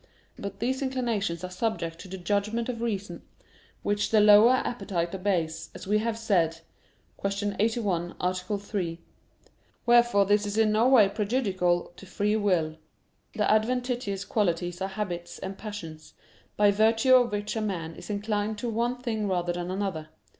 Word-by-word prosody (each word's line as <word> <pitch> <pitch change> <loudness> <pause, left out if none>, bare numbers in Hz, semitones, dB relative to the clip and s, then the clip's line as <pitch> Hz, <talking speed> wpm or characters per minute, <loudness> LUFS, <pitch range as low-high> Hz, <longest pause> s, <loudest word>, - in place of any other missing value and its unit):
But 200 -1 -7
these 260 +4 -1
inclinations 230 -10 -1
are 185 - -5
subject 180 -5 -2
to 190 - -9
the 190 +1 -6
judgment 205 +6 -1
of 230 -2 -4
reason, 205 -4 -3 0.6
which 205 0 0
the 220 - +4
lower 210 +4 +7
appetite 180 -9 -2
obeys, 170 -4 -1
as - - -8
we 210 +2 +2
have 225 0 -1
said 170 -8 +1 0.6
(Q. 200 +1 -1
81, 200 -6 0
A. 180 +1 +1
3). 185 -2 -3 0.9
Wherefore 240 -4 +5
this 205 +1 +2
is 205 +1 -3
in 220 -1 +4
no 225 +4 +3
way 235 -7 +7
prejudicial 195 -5 0
to 195 - -12
free 205 +3 0
will. 175 -7 +1 0.6
The 210 - +1
adventitious 235 -3 0
qualities 175 -4 -1
are 190 - -1
habits 185 -4 -5
and 190 +1 -6
passions, 175 -8 -8 0.4
by 205 -1 +5
virtue 225 +5 +3
of 245 -3 +5
which 205 +1 -3
a 220 - -1
man 170 -6 -3
is - - -11
inclined 210 +1 -1
to 235 +3 -3
one 235 +2 -1
thing 225 -4 -2
rather 175 -2 0
than 175 0 -4
to 185 - -3
another. 185 -6 -3
205 Hz, 160 wpm, -27 LUFS, 180-225 Hz, 0.9 s, lower